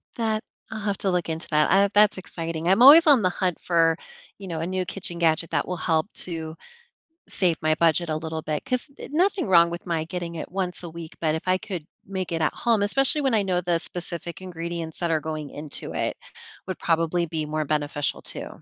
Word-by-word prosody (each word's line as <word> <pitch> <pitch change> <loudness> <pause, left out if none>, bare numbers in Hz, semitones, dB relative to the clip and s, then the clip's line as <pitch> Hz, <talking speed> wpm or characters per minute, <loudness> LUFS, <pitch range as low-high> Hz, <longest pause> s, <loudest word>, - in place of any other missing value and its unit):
That 220 -2 -1 0.3
I'll 220 - -4
have 205 -2 -1
to 195 - +1
look 175 -2 -1
into 160 +1 -4
that. 150 0 +3
I 195 +2 +5
that's 210 -1 +5
exciting. 165 -2 -5
I'm 195 +6 +4
always 315 +6 +10
on 280 -6 +7
the 185 - +3
hunt 180 -1 -1
for, 165 -1 +3 0.4
you 195 -2 -9
know, 165 -2 -3
a 165 - -2
new 185 -1 -1
kitchen 175 -2 -6
gadget 165 0 +2
that 145 -3 0
will 180 - -3
help 160 0 +1 0.2
to 160 -2 -5 0.7
save 175 -4 0
my 155 0 +2
budget 170 +1 +2
a 155 - 0
little 160 0 -4
bit, 155 - -3
'cause 255 +2 -2 0.2
nothing 365 - +1
wrong 170 -2 +6
with 170 +2 -6
my 165 -2 -1
getting 170 0 -5
it 160 - -6
once 180 -1 -3
a 170 - -6
week, 165 -1 -9
but 160 -1 +1
if 160 - -6
I 185 - +3
could 185 -6 -6 0.2
make 190 -2 -4
it 165 -1 -1
at 155 - +1
home- 230 -4 +1
especially 270 +8 +2
when 270 -3 +1
I 205 - +2
know 180 -2 0
the 175 -1 +1
specific 170 -1 -5
ingredients 170 -2 -5
that 170 -2 0
are 160 - +2
going 155 -2 -5
into 150 -1 -7
it- - - -1 0.5
would 185 - -4
probably 165 +1 +1
be 155 -1 -3
more 155 0 -2
beneficial 145 -1 -1
too. - - -5
170 Hz, 220 wpm, -25 LUFS, 160-190 Hz, 0.7 s, always